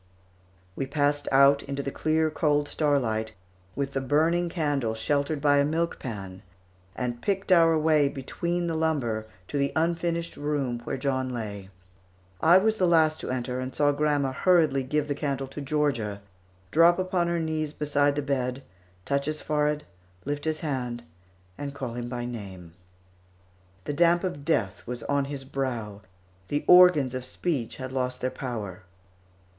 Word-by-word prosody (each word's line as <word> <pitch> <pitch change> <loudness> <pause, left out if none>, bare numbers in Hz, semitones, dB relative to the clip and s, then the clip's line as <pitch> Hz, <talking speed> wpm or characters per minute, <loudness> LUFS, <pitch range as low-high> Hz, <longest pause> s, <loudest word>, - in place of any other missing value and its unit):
We 135 - -3
passed 145 0 0
out 140 +1 +6
into 140 0 -4
the 140 - -3
clear 155 +1 +1
cold 150 -2 +1
starlight, 115 -9 0 0.4
with 140 0 -2
the 135 - -1
burning 160 +6 +2
candle 145 -9 -1
sheltered 140 +6 0
by 145 0 +4
a - - +4
milk 165 +3 -1
pan, 95 -6 -7 0.5
and 120 -1 -3
picked 195 -1 -1
our 165 -2 +6
way 155 -2 +3
between 170 +6 -3
the 170 - -1
lumber 135 -9 -1 0.2
to 145 - -2
the 140 0 +1
unfinished 170 +1 -1
room 145 -5 -1
where - - -3
John 130 -1 -1
lay. 105 -5 -5 0.7
I 170 +3 +7
was 220 +3 +2
the 185 - +3
last 160 -2 +3
to - - -5
enter, 125 0 -2
and 130 0 -5
saw 145 -1 +3
grandma 145 -2 +1
hurriedly 155 -2 +3
give 150 +3 -1
the 145 - 0
candle 140 -2 -2
to 145 - -7
Georgia, 130 -9 -1 0.5
drop 170 +4 +6
upon 185 -2 0
her 170 0 0
knees 155 -2 -2
beside 145 -1 +1
the 145 - -1
bed, 130 -1 -2 0.4
touch 140 0 0
his 155 0 -2
forehead, 150 0 0 0.4
lift 145 +1 -3
his 155 -1 -1
hand, 125 -6 -3 0.6
and 140 -1 -5
call 130 -4 -4
him 120 0 -5
by 120 -1 -4
name. 95 -8 -8 1.1
The 145 - -3
damp 170 +3 +3
of 160 -7 -4
death 110 - 0
was 120 -1 -5
on 140 -1 0
his 140 -1 -6
brow, 120 -7 -4 0.5
the 145 +5 -2
organs 180 -8 +7
of 130 -1 -4
speech 130 -2 -3
had 130 -1 -6
lost 125 -1 -2
their 130 - -1
power. 105 -7 -5
140 Hz, 160 wpm, -27 LUFS, 125-155 Hz, 1.1 s, I